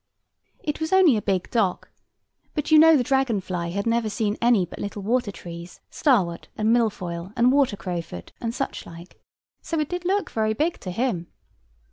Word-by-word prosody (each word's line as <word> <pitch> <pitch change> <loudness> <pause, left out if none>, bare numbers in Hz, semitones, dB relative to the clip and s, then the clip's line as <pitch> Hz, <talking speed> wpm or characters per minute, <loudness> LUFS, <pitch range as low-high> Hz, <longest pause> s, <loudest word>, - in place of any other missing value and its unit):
It 295 - -3
was 315 - -2
only 375 -8 +6
a 210 - 0
big 190 -3 -1
dock: 205 -6 0 0.6
but 300 0 -2
you 310 - +8
know 320 0 +7
the 250 - +1
dragon 265 -4 +1
fly 180 -2 -4
had 200 +3 -3
never 230 -1 +1
seen 210 0 -1
any 235 -6 +4
but - - -11
little 205 0 -5
water 230 0 0
trees; 170 -2 -10
starwort, 195 - +1
and 220 +1 +2
milfoil, 185 -6 -2
and 245 +2 +5
water 270 -7 +2
crowfoot, 170 - -6
and 230 - -1
such 270 +3 -4
like; 170 +2 -13 0.4
so 330 - -3
it 300 - -1
did 355 0 -4
look 390 +3 0
very 220 -1 0
big 320 +7 0
to 185 - -7
him. 180 -4 -1
220 Hz, 185 wpm, -24 LUFS, 185-270 Hz, 0.6 s, you